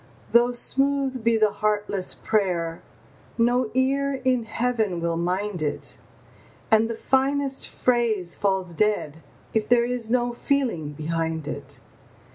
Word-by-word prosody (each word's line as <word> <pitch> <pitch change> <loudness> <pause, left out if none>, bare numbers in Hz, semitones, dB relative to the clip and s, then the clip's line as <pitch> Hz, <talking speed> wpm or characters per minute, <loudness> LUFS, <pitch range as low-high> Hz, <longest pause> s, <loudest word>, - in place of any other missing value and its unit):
Though 240 +1 +5
smooth 270 0 0
be 230 0 +3
the 215 -1 +3
heartless 205 -3 -1
prayer, 175 -6 -1 0.6
no 245 0 +2
ear 275 +1 +1
in 250 -3 +2
Heaven 225 -6 0
will 170 0 -1
mind 180 +2 -1
it, 150 -1 -3 0.7
And 220 +1 +5
the 230 - -2
finest 270 +2 +1
phrase 225 -8 +1
falls 190 -3 0
dead 165 -5 0 0.3
if 220 -1 0
there 240 -1 +5
is 245 -2 -3
no 240 0 +1
feeling 235 - -1
behind 160 0 -2
it. - - -5
220 Hz, 125 wpm, -24 LUFS, 180-250 Hz, 0.7 s, Though